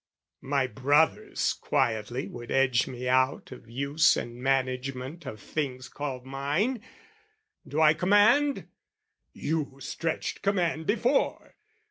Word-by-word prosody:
My 135 0 +1
brothers 140 +6 +1
quietly 120 +3 -1
would 120 - -9
edge 130 -3 +2
me 125 0 -5
out 130 +1 +1
Of 125 -2 -11
use 140 +6 +3
and 120 +1 -6
management 135 +3 -2
of 110 -4 -7
things 130 +1 -4
called 135 -3 -5
mine; 145 - -1 0.9
Do 145 +3 -2
I 155 -1 +7
command? 205 - +3 0.6
"You 150 -3 -3
stretched 165 +3 -3
command 175 -5 0
before!" 240 +6 0
135 Hz, 110 wpm, -28 LUFS, 130-160 Hz, 0.9 s, I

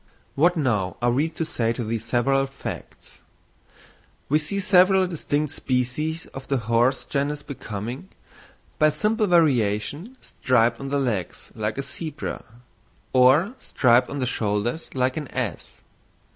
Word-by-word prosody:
What 175 +4 +3
now 105 - 0
are 120 0 +2
we 145 +6 +1
to 165 - -4
say 115 -7 -1
to 120 - -4
these 110 0 -3
several 135 +4 +1
facts? 135 0 -9 1.1
We 150 +3 +4
see 200 +6 -2
several 190 0 +5
distinct 150 -4 -2
species 135 +6 -1
of 135 - -8
the 135 - +1
horse 120 +3 +1
genus 145 +1 -2
becoming, 120 - -6 0.7
by 155 - +6
simple 215 +6 0
variation, 150 - +1
striped 120 -2 +1
on 135 - -5
the 140 - 0
legs 115 - -3
like 110 +1 -3
a 140 - -2
zebra, 155 +1 -5 0.7
or 135 - +5
striped 125 -1 +3
on 145 - -5
the 130 - -1
shoulders 115 +4 -2
like 130 +1 0
an 150 -3 -4
ass. 120 -9 -5
135 Hz, 140 wpm, -24 LUFS, 120-155 Hz, 1.1 s, by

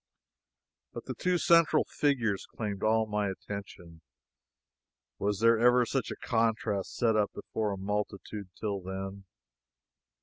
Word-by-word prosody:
But - - -7
the - - -4
two 180 0 +1
central 165 -2 +5
figures 120 -9 0
claimed 105 -3 -5
all 110 0 +3
my 105 -1 -1
attention. 95 -4 -8 1.2
Was 105 +1 -1
ever 120 +2 +5
such 130 0 -1
a - - -4
contrast 110 -4 0
set 115 -2 +2
up 105 -1 +2
before 110 -2 -2
a 100 - -3
multitude 100 0 -4
till 100 -3 -2
then? 95 +1 -6
105 Hz, 125 wpm, -30 LUFS, 100-115 Hz, 1.2 s, central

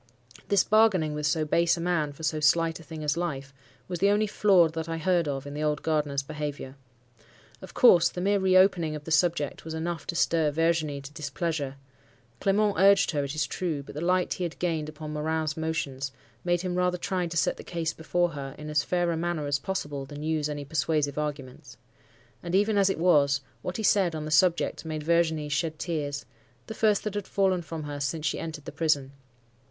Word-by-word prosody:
This 200 -2 +4
bargaining 210 -8 +3
with 150 0 -1
so 155 +2 +1
base 170 +3 +2
a - - -5
man 170 -4 0
for 145 +3 -12
so 155 0 0
slight 165 +2 +2
a - - -12
thing 160 -1 -8
as 150 0 +1
life, 140 -6 -3 0.3
was 180 -2 -4
the 200 - +4
only 210 +1 +3
flaw 195 -4 +4
that 160 +1 -5
I 165 - -2
heard 170 0 +1
of 135 -1 -3
in 145 - -7
the 150 - -4
old 150 -1 0
gardener's 150 -3 0
behaviour. 145 -2 -5 0.9
Of - - -11
course, 180 -9 +6
the - - -7
mere 200 +2 +2
reopening 185 -4 +3
of 150 - -7
the 160 - -7
subject 155 -2 +1
was 160 0 -6
enough 165 0 -4
to 170 - -3
stir 165 -2 +2
Virginie 155 -2 0
to 140 +1 -11
displeasure. 155 -2 -3 0.6
Clement 205 +1 +2
urged 195 0 +5
her, 145 -3 -1
it 140 +2 -4
is 155 -2 +1
true; 155 -3 -3
but - - -11
the 150 - -5
light 180 +1 +1
he 185 - -4
had 170 -2 -4
gained 160 -4 -1
upon 155 0 -7
Morin's 155 0 -1
motions, 140 -4 -3 0.3
made 175 -1 +1
him 180 -1 -3
rather 180 0 +1
try 180 0 -2
to 170 0 -4
set 140 - +1
the - - -9
case 165 -3 -3
before 175 +2 0
her 140 -3 -7
in 150 0 -7
as 150 -1 +3
fair 175 +1 0
a - - -1
manner 165 -2 -2
as 145 0 0
possible 145 -5 -4
than 145 +2 -8
use 155 -1 0
any 145 -1 -5
persuasive 145 0 0
arguments. 140 -2 -6 0.6
And, 175 +1 -3
even 205 +2 +3
as 200 -1 +4
it 195 - -1
was, 145 -5 +3 0.2
what 180 - -4
he 220 - -3
said 190 -5 +3
on 155 -1 -4
the 155 - -5
subject 170 +3 +2
made 155 -2 -4
Virginie 160 -2 +1
shed 155 +1 -1
tears—the 145 - -6
first 215 -2 +2
that 210 - -3
had 205 -2 -4
fallen 190 -3 +1
from 160 -1 -6
her 145 -1 -5
since 145 +3 -2
she 155 - 0
entered 160 -3 -6
the - - -6
prison. 145 -5 0
160 Hz, 210 wpm, -27 LUFS, 150-175 Hz, 0.9 s, course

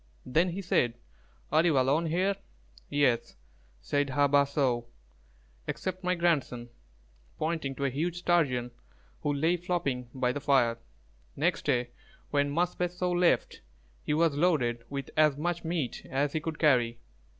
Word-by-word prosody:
Then 160 +8 +2
he 190 +3 -5
said, 120 -8 +1 0.6
"Are 155 +2 +4
you 165 -5 +3
alone 140 +6 +2
here?" 185 +5 +1 0.5
"Yes," 130 -5 +1 0.5
said 145 - 0
Hā 145 +1 +2
bāh 140 -1 +4
so, 125 -5 0 0.8
"except 185 0 -4
my 180 0 +1
grandson;" 145 -9 0 0.7
pointing 155 -4 -2
to 140 - -2
a 135 - 0
huge 165 +6 -2
Sturgeon 145 -9 +1 0.5
who 145 - 0
lay 160 +5 +1
flopping 140 -9 -2
by 125 -1 0
the 145 - -4
fire. 125 -5 +3 0.6
Next - - 0
day 120 -1 +1 0.4
when 145 -1 +1
Mūs 175 +4 0
bes 180 0 -2
so 180 0 0
left, 175 0 +2 0.4
he 150 - -1
was 165 -1 +3
loaded 140 -8 +1
with 140 -1 -5
as 150 -2 +4
much 170 +2 -2
meat 165 -6 -3
as 140 +2 0
he 155 - 0
could 155 0 -5
carry. 120 -6 +3
145 Hz, 150 wpm, -29 LUFS, 130-170 Hz, 0.8 s, Are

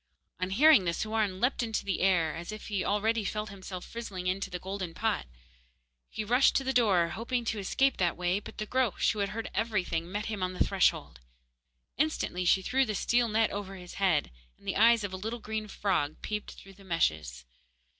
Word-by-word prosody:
On 185 0 -1
hearing 245 0 +6
this 170 -1 -1
Houarn 215 -3 -1
leaped 250 +4 +1
into 225 -2 -2
the 195 -3 -1
air, 175 -4 +2
as 170 +4 -6
if 215 0 -8
he 200 -3 -1
already 215 +2 +1
felt 210 +1 -3
himself 190 -2 -8
frizzling 200 -6 -6
in 185 +1 0
the 195 -2 -4
golden 185 -2 -5
pot. 220 - -1 0.8
He 215 - -4
rushed 245 +5 +4
to 270 - +2
the 265 0 -1
door, 195 -9 +3
hoping 235 +3 -2
to 220 -1 -1
escape 265 +7 +1
that 175 -2 +1
way; 180 +2 +1
but - - -11
the 215 - -3
Groac'h, 255 -1 +1
who 215 - -5
had 200 -1 0
heard 225 +1 -5
everything, 190 -6 -1
met 205 +2 -3
him 215 -3 -4
on 185 0 -1
the 180 - +2
threshold. 190 - +1 0.8
Instantly 275 - 0
she 190 +2 +4
threw 265 +7 +2
the 215 -5 -2
steel 235 +4 +2
net 220 +1 +2
over 195 -1 -5
his 180 -2 -10
head, 170 - +2 0.3
and - - -19
the - - -1
eyes 230 +1 +5
of 200 -2 -4
a - - -3
little 220 +5 -4
green 215 -1 -4
frog 185 -8 -1
peeped 210 -1 -4
through 195 - -14
the 195 +1 -17
meshes. 75 - -1
200 Hz, 205 wpm, -30 LUFS, 185-225 Hz, 0.8 s, hearing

